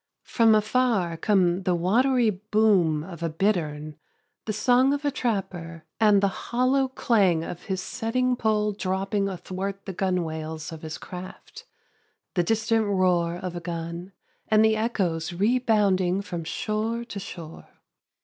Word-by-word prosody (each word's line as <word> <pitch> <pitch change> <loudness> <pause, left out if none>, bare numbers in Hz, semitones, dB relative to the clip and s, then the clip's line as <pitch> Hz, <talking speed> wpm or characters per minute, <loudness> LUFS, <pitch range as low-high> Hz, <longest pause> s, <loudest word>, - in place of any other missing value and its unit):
From 225 -2 +4
afar 215 -5 +1
come 180 0 +2
the 180 -1 +1
watery 235 +7 +3
boom 200 -6 +2
of 170 -1 -10
a 165 - -1
bittern, 155 -4 -1 0.5
the 220 - -2
song 250 +5 +3
of 285 +1 -6
a 285 - +2
trapper 175 - -3
and 210 -2 +5
the - - +5
hollow 255 +7 0
clang 200 -10 +2
of 170 - -7
his 190 -1 -3
setting 255 +3 -1
pole 215 -2 +1
dropping 195 +1 -1
athwart 190 +2 -5
the 195 - -5
gunwales 160 -4 -3
of 160 -1 -8
his 155 -1 -6
craft, 180 0 -10 0.7
the 180 - +2
distant 220 +3 +1
roar 180 -3 +2
of 180 0 -5
a - - -3
gun 170 +1 -5 0.4
and 215 0 +5
the 220 0 +3
echoes 185 -8 -1
rebounding 200 -3 +2
from 170 -4 -5
shore 220 +6 -2
to 215 -4 -6
shore. 165 -4 -9
195 Hz, 140 wpm, -25 LUFS, 175-220 Hz, 0.7 s, and